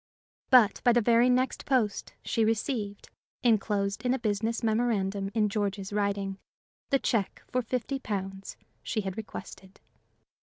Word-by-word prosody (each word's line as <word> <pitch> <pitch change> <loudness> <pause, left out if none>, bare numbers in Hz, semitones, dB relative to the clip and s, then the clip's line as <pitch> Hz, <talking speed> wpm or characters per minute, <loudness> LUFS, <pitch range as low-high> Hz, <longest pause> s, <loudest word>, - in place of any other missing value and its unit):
But 245 -6 +6
by 240 - +5
the 240 - +4
very 235 +2 +4
next 255 +1 +1
post 240 -7 0
she 225 - +1
received, 215 -2 -2 0.3
inclosed 205 -3 +1
in 250 +1 +2
a - - -1
business 225 +1 -1
memorandum 210 -4 0
in 215 -2 +3
George's 200 -2 -2
writing, 200 -1 -1 0.5
the 275 - +4
check 225 -6 -1
for 255 - -1
fifty 255 +3 -2
pounds 195 -4 -5 0.2
she 220 - -2
had 190 -2 -4
requested. 195 -3 -9
215 Hz, 135 wpm, -29 LUFS, 200-240 Hz, 0.5 s, But